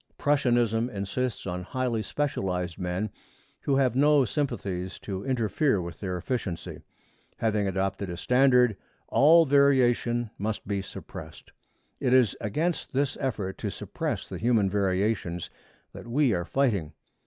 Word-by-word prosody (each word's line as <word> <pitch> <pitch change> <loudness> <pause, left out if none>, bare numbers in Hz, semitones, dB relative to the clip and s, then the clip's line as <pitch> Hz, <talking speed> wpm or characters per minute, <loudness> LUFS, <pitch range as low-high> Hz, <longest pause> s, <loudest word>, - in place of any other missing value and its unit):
Prussianism 120 -5 +2
insists 110 +3 -3
on 90 -1 -3
highly 120 +3 -2
specialized 90 - -2
men 90 +3 -2 0.5
who 140 - +1
have 130 -3 +2
no 145 0 +5
sympathies 100 -8 -3
to 95 -1 -5
interfere 130 -1 +1
with 85 -2 -6
their 90 -3 -3
efficiency. 95 -4 -4 0.6
Having 110 -3 +1
adopted 95 0 -2
a 85 - -5
standard, 125 +1 +4 0.3
all 165 +4 +6
variation 125 -5 +3
must 105 0 -3
be 100 -1 -1
suppressed. 95 - -10 0.5
It 130 -2 +3
is 125 -6 +4
against 155 - -2
this 140 +1 +1
effort 105 -8 -3
to - - -2
suppress - - -4
the - - -6
human 110 -5 +2
variations 95 -3 0 0.4
that - - -10
we 130 0 +2
are 85 -2 -1
fighting. 100 - 0
115 Hz, 130 wpm, -27 LUFS, 95-130 Hz, 0.6 s, all